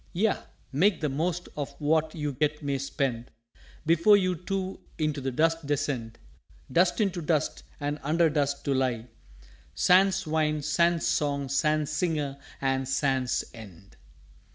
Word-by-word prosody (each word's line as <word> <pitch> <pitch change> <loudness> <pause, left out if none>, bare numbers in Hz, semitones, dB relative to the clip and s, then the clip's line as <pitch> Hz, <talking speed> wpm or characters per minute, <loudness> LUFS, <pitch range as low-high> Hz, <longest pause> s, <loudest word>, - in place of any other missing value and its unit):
"_Yea, 210 +4 +1 0.3
make 180 +7 +3
the 150 - 0
most 170 +5 -2
of 145 -2 -5
what 155 +1 +1
you 150 -3 -3
yet 150 0 0
may 140 -1 -1
spend, 130 -3 -2 0.6
Before 170 +6 +5
we 185 -3 +4
too 190 -1 -2 0.2
into 155 -3 -1
the 135 - -1
Dust 165 +3 +1
descend; 135 -6 -2 0.5
Dust 175 +4 +3
into 190 -5 0
Dust, 155 -1 0 0.2
and 145 +1 -2
under 165 +4 +3
Dust, 145 -2 -1
to 140 - +1
lie, 125 -4 0 0.7
Sans 190 +1 +4
Wine, 155 -1 0
sans 170 +2 +2
Song, 140 -2 0
sans 150 +2 +1
Singer, 150 -4 -1 0.2
and 135 -1 0
sans 135 -2 +1
End! 100 -5 -13
150 Hz, 140 wpm, -28 LUFS, 140-170 Hz, 0.7 s, Before